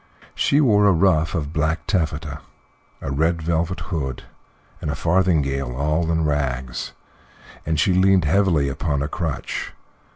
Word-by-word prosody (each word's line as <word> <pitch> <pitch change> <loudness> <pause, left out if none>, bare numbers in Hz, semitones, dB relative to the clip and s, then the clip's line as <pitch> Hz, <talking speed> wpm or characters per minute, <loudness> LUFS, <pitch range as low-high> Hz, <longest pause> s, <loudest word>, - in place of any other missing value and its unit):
She 145 - +2
wore 105 -8 +4
a - - +6
ruff 85 -2 +2
of 75 -1 -3
black 80 +2 -1
taffeta, 75 -5 -2 0.6
a 70 - -3
red 80 +4 +1
velvet 85 +2 -1
hood, 65 -7 -3 0.6
and - - -3
a 75 - -1
farthingale 75 -7 +1
all 75 +4 0
in 80 -1 +1
rags, 65 -4 -2 0.7
and 80 -2 0
she 95 - +3
leaned 95 -1 +4
heavily 80 -3 +2
upon 70 +1 -1
a - - -1
crutch. 75 -2 -4
80 Hz, 140 wpm, -22 LUFS, 70-85 Hz, 0.7 s, a